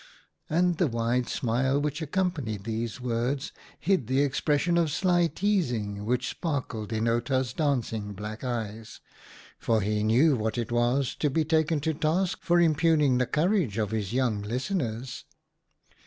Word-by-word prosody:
And 175 Hz, +1 st, +2 dB
the 175 Hz, -, +3 dB
wide 120 Hz, 0 st, 0 dB
smile 130 Hz, +3 st, +1 dB
which 145 Hz, +2 st, -2 dB
accompanied 150 Hz, -, -2 dB
these 115 Hz, +1 st, -3 dB
words 125 Hz, +3 st, -2 dB, 0.3 s
hid 175 Hz, -, +1 dB
the 130 Hz, +2 st, +2 dB
expression 145 Hz, +4 st, +1 dB
of 165 Hz, -2 st, +2 dB
sly 175 Hz, +2 st, +2 dB
teasing 120 Hz, -, -1 dB
which 125 Hz, +3 st, 0 dB
sparkled 125 Hz, -, -3 dB
in 110 Hz, +1 st, 0 dB
Outa's 125 Hz, +2 st, 0 dB
dancing 115 Hz, -9 st, -1 dB
black 105 Hz, +3 st, -7 dB
eyes, 115 Hz, -3 st, -4 dB, 0.6 s
for 115 Hz, -1 st, +1 dB
he 105 Hz, +1 st, 0 dB
knew 125 Hz, +8 st, +4 dB
what 110 Hz, 0 st, -2 dB
it 120 Hz, 0 st, -3 dB
was 120 Hz, +2 st, +1 dB
to 150 Hz, -, +2 dB
be 155 Hz, +3 st, +1 dB
taken 160 Hz, 0 st, +2 dB
to 160 Hz, +2 st, 0 dB
task 170 Hz, +4 st, 0 dB
for 175 Hz, 0 st, +3 dB
impugning 155 Hz, -5 st, +3 dB
the 125 Hz, -, +1 dB
courage 165 Hz, -, +1 dB
of 105 Hz, -2 st, -1 dB
his 110 Hz, -3 st, -2 dB
young 120 Hz, -4 st, 0 dB
lis 120 Hz, -, -3 dB
teners. 125 Hz, -, -3 dB
130 Hz, 155 wpm, -27 LUFS, 115-155 Hz, 0.6 s, knew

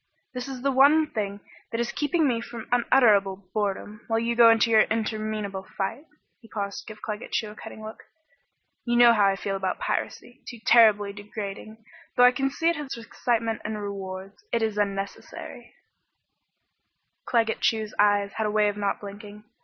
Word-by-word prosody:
"This 250 Hz, +1 st, -5 dB
is 260 Hz, -2 st, -7 dB
the 275 Hz, -, +2 dB
one 295 Hz, +4 st, +5 dB
thing 200 Hz, -2 st, -3 dB, 0.3 s
that 230 Hz, -, -2 dB
is 240 Hz, 0 st, -1 dB
keeping 305 Hz, +3 st, +1 dB
me 235 Hz, -3 st, 0 dB
from 235 Hz, -1 st, -8 dB
unutterable 200 Hz, -6 st, +3 dB
boredom, 210 Hz, 0 st, -3 dB
while 225 Hz, -, +1 dB
you 235 Hz, +1 st, 0 dB
go 235 Hz, -1 st, +8 dB
into 230 Hz, 0 st, +4 dB
your 220 Hz, -1 st, +7 dB
interminable 215 Hz, -3 st, -2 dB, 0.2 s
fight." 200 Hz, +10 st, -3 dB, 0.3 s
He 225 Hz, -, -17 dB
paused 200 Hz, -2 st, -4 dB
to -, -, -12 dB
give 215 Hz, 0 st, -14 dB
Claggett 210 Hz, +1 st, -6 dB
Chew 215 Hz, -2 st, -1 dB
a -, -, -13 dB
cutting 215 Hz, -, -10 dB
look. 215 Hz, 0 st, -9 dB, 0.8 s
"You 240 Hz, -1 st, 0 dB
know 240 Hz, -1 st, +8 dB
how 205 Hz, -3 st, +4 dB
I 195 Hz, -, +2 dB
feel 195 Hz, +1 st, -3 dB
about 190 Hz, -1 st, -2 dB
piracy 245 Hz, +2 st, -4 dB
too 240 Hz, -, -9 dB
terribly 210 Hz, -4 st, +5 dB
degrading, 210 Hz, +1 st, -8 dB, 0.3 s
though 245 Hz, -, +6 dB
I 250 Hz, -, +8 dB
can 270 Hz, +2 st, -1 dB
see 325 Hz, +4 st, -2 dB
it 335 Hz, -2 st, +2 dB
has 295 Hz, -2 st, -5 dB
its 230 Hz, -, -10 dB
excitement 230 Hz, -1 st, -1 dB
and 215 Hz, 0 st, -4 dB
rewards. 195 Hz, -, -7 dB
But 230 Hz, -, +1 dB
it -, -, +4 dB
is 215 Hz, -2 st, -4 dB
unnecessary 200 Hz, -1 st, -5 dB, 0.8 s
" -, -, -52 dB
Claggett 225 Hz, -2 st, +1 dB
Chew's 220 Hz, -2 st, 0 dB
eyes 205 Hz, -1 st, +3 dB
had 220 Hz, -1 st, -1 dB
a -, -, -1 dB
way 210 Hz, -1 st, +3 dB
of 205 Hz, -, -5 dB
not 200 Hz, -1 st, -1 dB
blinking. 205 Hz, +1 st, -10 dB
215 Hz, 190 wpm, -26 LUFS, 205-235 Hz, 0.8 s, go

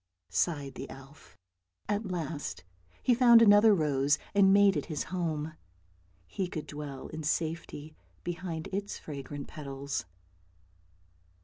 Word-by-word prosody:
" 90 Hz, -1 st, -56 dB
sighed 140 Hz, -, 0 dB
the -, -, -7 dB
elf. 135 Hz, +3 st, -14 dB, 0.5 s
At 210 Hz, +1 st, -1 dB
last 155 Hz, -, -4 dB, 0.4 s
he 250 Hz, -, +4 dB
found 235 Hz, -1 st, +7 dB
another 215 Hz, 0 st, +7 dB
rose, 145 Hz, -3 st, +2 dB, 0.2 s
and 195 Hz, -1 st, +6 dB
made 200 Hz, -1 st, +6 dB
it 145 Hz, -, -2 dB
his 155 Hz, -3 st, -2 dB
home. 160 Hz, -3 st, -2 dB, 0.7 s
He 180 Hz, -, -3 dB
could 160 Hz, -3 st, -5 dB
dwell 145 Hz, -2 st, -7 dB
in 155 Hz, -, -6 dB
safety 155 Hz, -1 st, -3 dB, 0.3 s
behind 170 Hz, -2 st, -4 dB
its 200 Hz, +1 st, -3 dB
fragrant 145 Hz, -1 st, -7 dB
petals. 140 Hz, -, -5 dB
155 Hz, 125 wpm, -30 LUFS, 140-190 Hz, 0.7 s, found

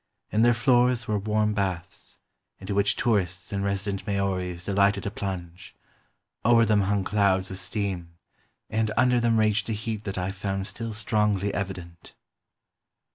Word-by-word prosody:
In 110 Hz, -, +2 dB
their 120 Hz, 0 st, +5 dB
floors 120 Hz, -1 st, +3 dB
were 105 Hz, -1 st, 0 dB
warm 105 Hz, +1 st, +1 dB
baths, 95 Hz, -4 st, -3 dB, 0.4 s
into 95 Hz, +1 st, -5 dB
which 100 Hz, 0 st, +2 dB
tourists 95 Hz, -5 st, 0 dB
and 100 Hz, 0 st, -1 dB
resident 100 Hz, 0 st, -2 dB
Maoris 90 Hz, -3 st, -2 dB
delighted 100 Hz, 0 st, +2 dB
to 100 Hz, -, -3 dB
plunge; 95 Hz, -2 st, -6 dB, 0.7 s
over 115 Hz, 0 st, +5 dB
them 105 Hz, -1 st, +3 dB
hung 100 Hz, 0 st, +1 dB
clouds 95 Hz, -2 st, +1 dB
of 95 Hz, -, -4 dB
steam, 90 Hz, -3 st, -4 dB, 0.5 s
and 110 Hz, 0 st, 0 dB
under 125 Hz, -1 st, +4 dB
them 115 Hz, -1 st, +2 dB
raged 110 Hz, -1 st, +2 dB
a -, -, 0 dB
heat 110 Hz, 0 st, -4 dB
that 95 Hz, -1 st, -4 dB
I 90 Hz, +1 st, -1 dB
found 95 Hz, 0 st, -3 dB
still 115 Hz, +2 st, -5 dB
strongly 105 Hz, -2 st, +1 dB
evident." 90 Hz, -4 st, -6 dB
100 Hz, 150 wpm, -26 LUFS, 95-110 Hz, 0.7 s, their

